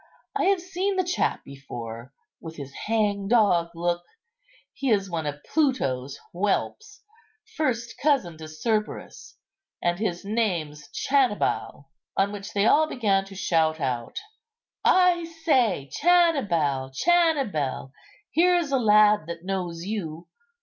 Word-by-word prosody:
I - - +1
have 390 -2 +3
seen 375 +2 -2
the 370 - +2
chap 355 0 -1
before, 120 -3 -8 0.3
with 160 -1 -8
his 140 -2 -8
hangdog 205 -4 +2
look. 175 +1 -1 0.7
He 275 - -2
is 195 -4 +1
one 160 -3 -2
of 145 0 -5
Pluto's 140 - 0
whelps, 205 - -2 0.5
first 240 -7 -2
cousin 275 - +2
to 155 - -8
Cerberus, 210 +7 -3 0.4
and 175 +1 0
his 180 -4 -2
name's 175 -9 -2
Channibal." 245 - 0 0.3
On 200 +1 +2
which 205 -1 -7
they 200 0 +2
all 310 +6 +5
began 200 -8 +1
to 195 0 -12
shout 160 -4 +1
out, 120 -5 -3 0.7
"I 360 -2 +4
say, 265 - +1
Channibal, 205 - +3
Channibal, 275 - +1 0.4
here's 345 -2 +3
a 270 - +2
lad 210 -5 +5
that 170 +1 -7
knows 180 -3 -3
you. 175 -6 -5
200 Hz, 120 wpm, -25 LUFS, -, 0.7 s, all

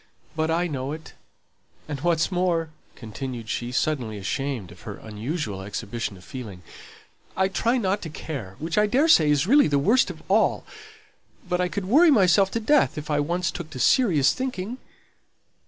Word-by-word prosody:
But 160 0 0
I 170 +2 +1
know 140 -3 -3
it; 160 +1 -10 0.7
and 145 -2 -4
what's 165 +1 +1
more," 175 -3 0 0.2
continued 115 0 -7
she, 120 0 -3
suddenly 125 -5 -1
ashamed 110 0 -3
of 85 - -15
her 100 - -7
unusual 110 - -5
exhibition 100 +1 -5
of 90 - -16
feeling, 105 -9 -8 0.7
"I 190 0 +3
try 230 +6 0
not 200 -3 0
to 165 - -6
care, 135 -11 -7
which 165 +6 -1
I 210 - +3
daresay 250 - +4
is 145 +1 +3
really 280 +8 +5
the 145 -1 +1
worst 220 - +3
of - - -9
all; - - +2 0.8
but 180 0 0
I 180 - +1
could 195 +1 -4
worry 300 - +5
myself 195 - +4
to 230 - 0
death 260 - +2
if 150 +1 -5
I 145 - +2
once 170 +3 -1
took 170 -3 -7
to 130 - -8
serious 160 - +4
thinking." 250 -2 -4
160 Hz, 170 wpm, -24 LUFS, 125-190 Hz, 0.8 s, really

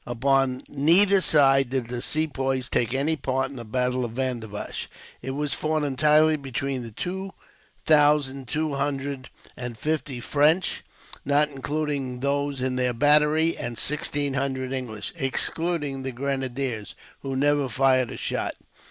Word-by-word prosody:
Upon 130 +1 +1
neither 185 +7 +5
side 135 -5 +4
did 130 -3 -2
the 120 -1 -3
Sepoys 135 -4 -1
take 120 -1 0
any 145 +4 +1
part 135 -3 -1
in - - -10
the 120 - -6
battle 125 +2 -1
of 115 -2 -4
Vandivash. 120 -5 -4 0.3
It 130 - -6
was 145 0 -2
fought 155 0 -1
entirely 150 +3 +3
between 135 -1 -3
the 115 - -7
two 190 - -5 0.5
thousand 145 -4 +3
two 155 +3 -1
hundred 140 -1 -3 0.3
and 125 -2 -6
fifty 150 -2 -2
French, 150 +8 +2 0.4
not 145 +2 +2
including 140 -2 -3
those 140 -1 -1
in 130 0 -1
their 125 -1 +1
battery, 150 +5 +3
and 120 -1 -5
sixteen 145 -1 0
hundred 130 -1 -2
English, 110 -6 -5
excluding 145 +1 -1
the 130 0 -4
grenadiers, 130 -3 -3 0.2
who 135 -1 -4
never 145 0 +2
fired 130 0 +2
a - - -7
shot. - - -2
135 Hz, 145 wpm, -25 LUFS, 130-150 Hz, 0.5 s, neither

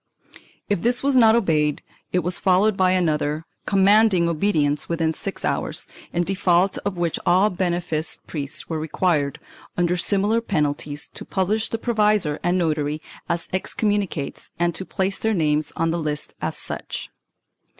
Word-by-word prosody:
If 205 -4 0
this 245 +2 +1
was 280 -1 +2
not 225 -3 +6
obeyed, 155 -9 +1 0.3
it 180 -2 +1
was 180 +1 0
followed 195 +2 +3
by 185 -1 +3
another, 155 -3 0 0.2
com 195 -2 +3
manding 200 -4 +5
obedience 155 -4 +1
within 165 -1 0
six 195 +4 -4
hours, - - -2 0.3
in 175 - +1
default 185 0 +2
of 200 -3 -4
which 170 -2 -1
all 185 +4 +4
beneficed 175 -3 -2
priests 145 -2 -5
were 160 -2 -2
required, 155 -2 0 0.4
under 175 0 +2
similar 205 +5 +2
penalties, 150 -7 -1
to - - -7
pub 190 -1 -1
lish 220 +1 0
the 225 - -2
provisor 210 -9 +1
and 175 +1 +1
notary 155 -3 0 0.3
as 170 0 -1
excommunicates 195 -5 -1
and 175 0 +1
to 190 - -5
place 190 +1 -1
their 220 -1 +1
names 155 -3 +1
on 165 0 +1
the 170 - -1
lists 150 -1 -3
as - - -2
such. - - -6
175 Hz, 160 wpm, -23 LUFS, 155-200 Hz, 0.4 s, not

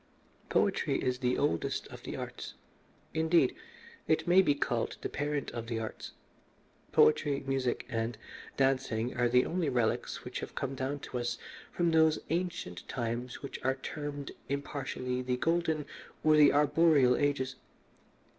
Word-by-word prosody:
"Poetry - - +2
is 125 0 -1
the 125 -1 +1
oldest 115 - 0
of - - -10
the - - -6
arts. - - -6 0.6
Indeed, 160 -4 +3 0.5
it 160 +2 +2
may 180 +2 +7
be 145 -6 +2
called 120 -4 -1
the - - -3
parent 145 -1 -2
of 115 -1 -5
the 115 -1 -2
arts. 110 -1 -6 0.8
Poetry, 145 -2 +4
music, 135 -2 -1
and 115 0 -2 0.4
dancing 130 -3 +1
are 120 -1 +2
the 125 +1 +4
only 170 -3 0
relics 120 -4 0
which - - -4
have - - -7
come 135 -1 -2
down 135 +2 -3
to 125 - -4
us 120 0 -2 0.3
from 170 -1 +1
those 160 -1 +5
ancient 165 - -3
times 120 +2 -3
which 140 - -6
are 130 0 +2
termed 145 +1 -5 0.2
impartially 135 -2 -3
the 125 0 -1
Golden 160 0 +1 0.4
or 155 0 +5
the 150 -2 +7
Arboreal 150 -3 +4
Ages. 135 -3 0
135 Hz, 145 wpm, -31 LUFS, 125-150 Hz, 0.8 s, may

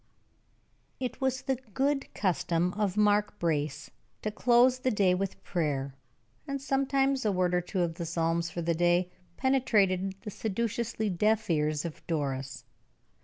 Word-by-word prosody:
It 255 0 -4
was 265 -1 0
the 265 -1 0 0.2
good 275 +1 0
custom 180 -2 0
of 205 -2 -1
Mark 210 0 +3
Brace 150 -4 -1 0.3
to 215 - -1
close 245 +3 +4
the 255 - +1
day 200 -5 +3
with 190 +1 -3
prayer; 145 -6 -1 0.5
and 275 0 -2
sometimes 270 0 +1
a 210 - +2
word 180 -1 +1
or 180 - +3
two 180 +2 -2
of 170 -1 0
the 170 +1 -5
psalms 165 0 0
for 170 +1 -4
the 170 +1 +1
day 175 +2 +2 0.3
penetrated 200 -8 +2
the 210 - -6
sedulously 225 +2 -2
deaf 215 +2 +1
ears 150 0 0
of 165 - -6
Doris. 135 -4 -3
190 Hz, 150 wpm, -29 LUFS, 170-235 Hz, 0.5 s, close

